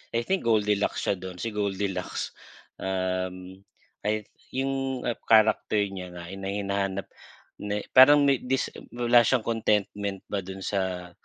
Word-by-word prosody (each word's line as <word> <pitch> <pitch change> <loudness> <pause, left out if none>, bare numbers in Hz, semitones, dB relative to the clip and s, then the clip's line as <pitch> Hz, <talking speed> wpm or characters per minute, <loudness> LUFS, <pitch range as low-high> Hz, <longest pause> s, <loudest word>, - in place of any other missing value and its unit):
I 115 - +1
think 190 -4 -1
Gold 110 -2 +4
Deluxe 105 0 0
siya 100 - 0
dun 95 0 -7
si 115 +6 -4
Gold 100 -2 -1
Deluxe. 95 -2 -3 0.5
Um, 95 0 -3 0.5
ay, 105 0 0 0.3
yung 135 -1 -1 0.2
character 110 -1 +4
niya 95 -2 -5
na 85 - -7
hina 95 0 -6
hinahanap 100 -1 -2 0.5
na 105 0 -2
parang 145 +3 +8
may 140 -2 +3
dis 130 +1 -1 0.2
wala 120 0 +5
siyang 120 0 +2
contentment 105 -3 -1
ba 100 - 0
dun 95 0 -7
sa 95 -3 -2
100 Hz, 145 wpm, -27 LUFS, 95-115 Hz, 0.5 s, parang